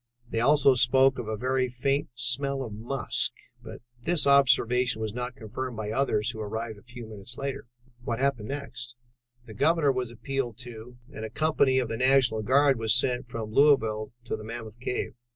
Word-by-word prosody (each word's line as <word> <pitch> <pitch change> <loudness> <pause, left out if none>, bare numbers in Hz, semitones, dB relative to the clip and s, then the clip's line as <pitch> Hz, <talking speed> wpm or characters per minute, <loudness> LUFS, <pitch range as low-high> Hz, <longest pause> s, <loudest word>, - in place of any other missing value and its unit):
They 115 - -2
also 140 +2 +5
spoke 130 +2 +3
of 115 - -5
a 110 0 -3
very 130 +2 0
faint 135 +3 -1
smell 135 +3 0
of 115 -4 -7
musk, 120 +4 -1 0.3
but - - -11 0.2
this 170 +4 +2
observation 125 -3 +4
was 110 -2 -3
not 125 +1 -4
confirmed 120 +2 -6
by 105 -1 -4
others 115 -3 0
who 110 - -9
arrived 110 0 -5
a - - -19
few 120 0 -10
moments 110 +2 -9
later." 140 -3 -5 0.4
"What 120 -3 -2
happened 130 -5 -1
next?" 135 -4 -6 0.5
"The 110 - -11
Governor 155 +5 +3
was 125 -2 -3
appealed 120 -1 -4
to 120 0 -10 0.2
and 110 - -7
a 110 - -4
company 140 0 +2
of 130 -2 +1
the 115 0 -4
National 130 -3 +3
Guard 135 +3 +3
was 110 0 +4
sent 125 0 +2
from 115 -3 -6
Louisville 110 -6 +3
to 120 - -4
Mammoth 115 +1 -8
Cave. 125 0 -3
125 Hz, 180 wpm, -27 LUFS, 110-135 Hz, 0.5 s, also